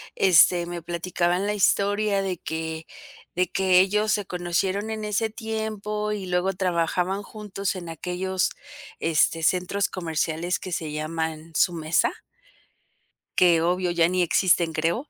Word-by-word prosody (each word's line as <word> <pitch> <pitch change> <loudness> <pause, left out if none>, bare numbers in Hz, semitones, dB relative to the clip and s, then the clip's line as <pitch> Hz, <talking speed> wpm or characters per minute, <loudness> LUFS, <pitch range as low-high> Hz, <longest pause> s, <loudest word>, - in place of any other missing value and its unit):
este, 175 -1 +5
me 175 -1 -6
platicaban 175 +2 -1
la 210 - 0
historia 205 0 +2
de 185 -3 -2
que 160 0 -5 0.5
de 180 +1 +2
que 185 -1 +4
ellos 210 +3 +2
se 205 -2 -1
conocieron 185 +4 -1
en 220 -1 -4
ese 210 +1 0
tiempo, 215 -1 -3
y 200 -2 -4
luego 180 +1 0
trabajaban 180 +1 0
juntos 200 -2 -4
en 175 -3 -7
aquellos, 180 +3 -1 0.5
este, 165 0 +2
centros 185 +4 +1
comerciales 165 0 -2
que 185 - -8
se 155 -3 -3
llaman 160 +1 -4
Sumesa 165 -2 +1 1.2
que 170 -3 +5
obvio 180 +1 +1
ya 170 -1 +3
ni 185 +1 0
existen 175 -1 +3
creo, 170 - -1
180 Hz, 135 wpm, -25 LUFS, 170-200 Hz, 1.2 s, este